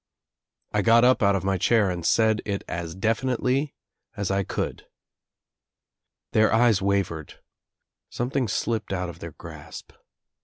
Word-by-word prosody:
I 105 Hz, -, +1 dB
got 115 Hz, +2 st, +5 dB
up 130 Hz, +1 st, +4 dB
out 100 Hz, -1 st, +4 dB
of 95 Hz, -, -2 dB
my 95 Hz, -1 st, 0 dB
chair 105 Hz, -1 st, +3 dB
and 85 Hz, -1 st, -5 dB
said 110 Hz, +3 st, +3 dB
it 100 Hz, -2 st, -3 dB
as 85 Hz, -1 st, -5 dB
definitely 125 Hz, +6 st, 0 dB, 0.4 s
u 100 Hz, -, -2 dB
I 100 Hz, 0 st, +1 dB
could. -, -, -4 dB, 1.4 s
Their 110 Hz, 0 st, +3 dB
eyes 115 Hz, -3 st, +4 dB
wavered. 95 Hz, -6 st, -1 dB, 0.7 s
Something 125 Hz, +1 st, -1 dB
slipped 110 Hz, 0 st, -2 dB
out 90 Hz, -1 st, -2 dB
of 85 Hz, -1 st, -10 dB
their 85 Hz, -3 st, -8 dB
grasp. -, -, -11 dB
105 Hz, 140 wpm, -25 LUFS, 95-115 Hz, 1.4 s, got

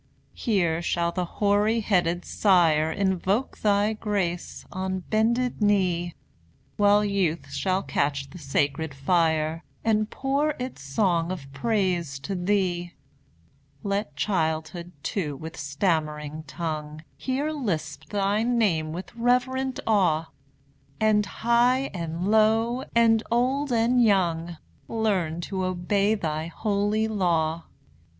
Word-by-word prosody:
Here 175 Hz, -8 st, 0 dB
shall 170 Hz, 0 st, 0 dB
the 180 Hz, +1 st, -2 dB
hoary 210 Hz, +5 st, +1 dB
headed 175 Hz, -4 st, +1 dB
sire 165 Hz, -6 st, +3 dB
Invoke 195 Hz, +6 st, 0 dB
thy 205 Hz, +1 st, +2 dB
grace, 200 Hz, -5 st, -3 dB
on 190 Hz, 0 st, -3 dB
bended 230 Hz, +5 st, 0 dB
knee; 180 Hz, -4 st, +1 dB, 0.6 s
While 205 Hz, 0 st, +4 dB
youth 190 Hz, -5 st, -1 dB
shall 190 Hz, 0 st, 0 dB
catch 140 Hz, 0 st, -1 dB
the 180 Hz, -, -10 dB
sacred 145 Hz, +1 st, -1 dB
fire, 160 Hz, +2 st, +1 dB, 0.2 s
And 215 Hz, -1 st, +2 dB
pour 285 Hz, +3 st, 0 dB
its 250 Hz, -, -6 dB
song 170 Hz, +4 st, 0 dB
of 175 Hz, -7 st, -5 dB
praise 175 Hz, -3 st, 0 dB
to 195 Hz, -, -4 dB
Thee. 180 Hz, -2 st, 0 dB, 0.9 s
Let 200 Hz, -6 st, -2 dB
childhood, 160 Hz, 0 st, -1 dB
too, 155 Hz, -8 st, -2 dB
with 160 Hz, +4 st, -8 dB
stammering 150 Hz, 0 st, -2 dB
tongue, 155 Hz, -1 st, -5 dB
Here 275 Hz, +4 st, -2 dB
lisp 160 Hz, -, -3 dB
thy 200 Hz, +5 st, 0 dB
name 205 Hz, -10 st, +1 dB
with 180 Hz, +6 st, -7 dB
reverent 250 Hz, +2 st, +1 dB
awe; 175 Hz, -7 st, +2 dB, 0.7 s
And 210 Hz, -2 st, +3 dB
high 240 Hz, +6 st, +2 dB
and 170 Hz, 0 st, -3 dB
low, 225 Hz, +4 st, +3 dB
and 225 Hz, -1 st, +5 dB
old 260 Hz, +4 st, +1 dB
and 240 Hz, +1 st, +3 dB
young, 175 Hz, -5 st, +1 dB, 0.3 s
Learn 190 Hz, -7 st, 0 dB
to 190 Hz, +2 st, -3 dB
obey 195 Hz, +4 st, +1 dB
thy 160 Hz, -5 st, -3 dB
holy 205 Hz, +4 st, 0 dB
law. 170 Hz, -6 st, 0 dB
190 Hz, 115 wpm, -26 LUFS, 165-220 Hz, 0.9 s, and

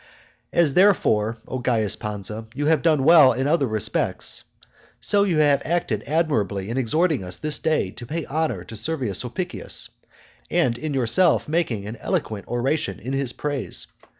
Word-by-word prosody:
As 165 Hz, -5 st, +3 dB
therefore, 115 Hz, -, +3 dB
O 130 Hz, -, -4 dB
Caius 115 Hz, -4 st, +1 dB
Pansa, 105 Hz, +1 st, -5 dB
you 145 Hz, -, -1 dB
have 160 Hz, +1 st, +3 dB
done 155 Hz, -5 st, +3 dB
well 150 Hz, -4 st, +7 dB
in 130 Hz, +3 st, -1 dB
other 145 Hz, -2 st, +2 dB
respects, 110 Hz, -1 st, -1 dB, 0.6 s
so 205 Hz, -1 st, +2 dB
you 180 Hz, -5 st, +1 dB
have 145 Hz, -2 st, +4 dB
acted 155 Hz, -11 st, -1 dB
admirably 110 Hz, -, 0 dB
in 120 Hz, -, -3 dB
exhorting 155 Hz, -, +1 dB
us 90 Hz, 0 st, -4 dB
this 150 Hz, -1 st, -1 dB
day 155 Hz, -12 st, 0 dB
to 120 Hz, -, -10 dB
pay 160 Hz, +3 st, -3 dB
honour 145 Hz, -, -2 dB
to 110 Hz, -, -10 dB
Servius 120 Hz, -, -2 dB
Sulpicius, 175 Hz, +9 st, -4 dB, 0.6 s
and 120 Hz, -2 st, +2 dB
in 150 Hz, +3 st, -4 dB
yourself 135 Hz, +8 st, +2 dB
making 150 Hz, -11 st, -1 dB
an 110 Hz, +3 st, -6 dB
eloquent 105 Hz, -2 st, -3 dB
oration 130 Hz, +6 st, -1 dB
in 130 Hz, -, -5 dB
his 135 Hz, -3 st, 0 dB
praise. 145 Hz, -3 st, -4 dB
135 Hz, 160 wpm, -23 LUFS, 110-155 Hz, 0.6 s, well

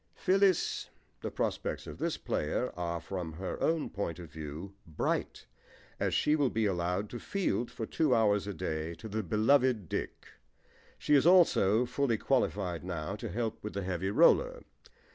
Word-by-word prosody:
PHYLLIS 195 Hz, -1 st, +2 dB, 0.3 s
The -, -, -3 dB
prospects -, -, -2 dB
of -, -, -9 dB
this -, -, -1 dB
player -, -, -2 dB
are, 85 Hz, 0 st, -2 dB
from 85 Hz, -2 st, -5 dB
her 90 Hz, +4 st, -5 dB
own 165 Hz, -1 st, +1 dB
point 85 Hz, -5 st, -3 dB
of 85 Hz, -4 st, -10 dB
view, 80 Hz, +5 st, -7 dB
bright, 80 Hz, -, -2 dB, 0.5 s
as -, -, 0 dB
she 150 Hz, -, +3 dB
will 145 Hz, -4 st, +2 dB
be 110 Hz, -1 st, 0 dB
allowed 90 Hz, +1 st, 0 dB
to 120 Hz, -, -5 dB
field 125 Hz, -, -1 dB
for 110 Hz, -, -5 dB
two 145 Hz, +1 st, +2 dB
hours 105 Hz, -3 st, +2 dB
a 100 Hz, -, -3 dB
day 80 Hz, -2 st, -3 dB
to 85 Hz, -, -9 dB
the 110 Hz, +1 st, -2 dB
beloved 110 Hz, -, +2 dB
Dick. -, -, -4 dB, 0.7 s
She 150 Hz, -, 0 dB
is 145 Hz, +2 st, +5 dB
also 125 Hz, -, +5 dB
fully 125 Hz, -3 st, 0 dB
qualified 100 Hz, -10 st, 0 dB
now 85 Hz, 0 st, -4 dB
to -, -, -5 dB
help 115 Hz, +3 st, -3 dB
with 105 Hz, -, -5 dB
the 100 Hz, -, -3 dB
heavy 95 Hz, +1 st, -2 dB
roller. -, -, +4 dB
105 Hz, 165 wpm, -31 LUFS, 90-130 Hz, 0.7 s, is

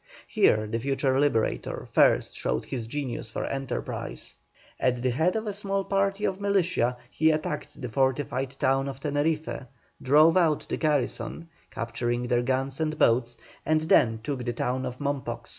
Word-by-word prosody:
Here 110 Hz, 0 st, +3 dB
the 110 Hz, +2 st, -2 dB
future 135 Hz, +1 st, +1 dB
Liberator 140 Hz, -6 st, 0 dB
first -, -, +3 dB
showed 65 Hz, -, -2 dB
his 120 Hz, -5 st, -5 dB
genius 130 Hz, -3 st, -4 dB
for -, -, -3 dB
enterprise. 135 Hz, -, -5 dB, 0.4 s
At 125 Hz, -1 st, +1 dB
the 130 Hz, -, +2 dB
head 160 Hz, -, +1 dB
of 220 Hz, 0 st, -2 dB
a 210 Hz, -, -2 dB
small 195 Hz, -1 st, -1 dB
party 195 Hz, +1 st, 0 dB
of 190 Hz, +1 st, -2 dB
militia, 180 Hz, -11 st, +1 dB
he 160 Hz, +1 st, +3 dB
attacked 155 Hz, -1 st, -2 dB
the 125 Hz, -, -4 dB
fortified 135 Hz, +1 st, 0 dB
town 135 Hz, +1 st, +2 dB
of 135 Hz, -1 st, -7 dB
Teneriffe, 150 Hz, -1 st, -1 dB, 0.3 s
drove 155 Hz, +6 st, +5 dB
out 160 Hz, -4 st, +2 dB
the -, -, -2 dB
garrison, 150 Hz, 0 st, -1 dB, 0.2 s
capturing 120 Hz, +1 st, -2 dB
their 120 Hz, 0 st, +2 dB
guns 135 Hz, +2 st, -1 dB
and 155 Hz, -1 st, -1 dB
boats, 120 Hz, -1 st, +2 dB, 0.3 s
and 155 Hz, 0 st, +2 dB
then 115 Hz, -7 st, +3 dB
took 135 Hz, -1 st, -3 dB
the 120 Hz, 0 st, -2 dB
town 125 Hz, +2 st, -1 dB
of 125 Hz, -, -6 dB
Mompox. 130 Hz, -5 st, -3 dB
135 Hz, 160 wpm, -27 LUFS, 120-155 Hz, 0.4 s, drove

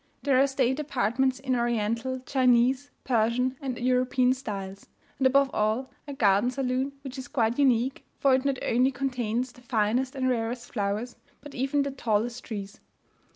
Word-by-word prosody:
There 265 Hz, -1 st, +4 dB
are 275 Hz, -, +4 dB
state 265 Hz, 0 st, 0 dB
apartments 260 Hz, -2 st, 0 dB
in 260 Hz, -1 st, -1 dB
Oriental, 235 Hz, +2 st, -1 dB
Chinese, 255 Hz, +1 st, +3 dB
Persian, 250 Hz, +2 st, +1 dB
and 260 Hz, -3 st, -3 dB
European 255 Hz, 0 st, +2 dB
styles; 200 Hz, -6 st, -7 dB, 0.3 s
and, 265 Hz, -, +5 dB
above 275 Hz, +1 st, +3 dB
all, 215 Hz, +5 st, 0 dB, 0.2 s
a 285 Hz, -, -5 dB
garden 205 Hz, -1 st, +3 dB
saloon, 260 Hz, +1 st, -1 dB
which 265 Hz, -1 st, -7 dB
is 260 Hz, -, -7 dB
quite 235 Hz, -2 st, 0 dB
unique, 260 Hz, -1 st, +2 dB
for 275 Hz, -1 st, +3 dB
it 260 Hz, 0 st, +2 dB
not 275 Hz, -1 st, 0 dB
only 250 Hz, +3 st, +3 dB
contains 250 Hz, -2 st, -2 dB
the 245 Hz, -, -18 dB
finest 245 Hz, +2 st, 0 dB
and 260 Hz, -1 st, 0 dB
rarest 240 Hz, 0 st, -2 dB
flowers 210 Hz, +3 st, -2 dB, 0.2 s
but 290 Hz, -, -11 dB
even 275 Hz, +3 st, 0 dB
the 280 Hz, -, -3 dB
tallest 235 Hz, -1 st, -1 dB
trees. 200 Hz, -3 st, -6 dB
255 Hz, 160 wpm, -27 LUFS, 230-265 Hz, 0.3 s, and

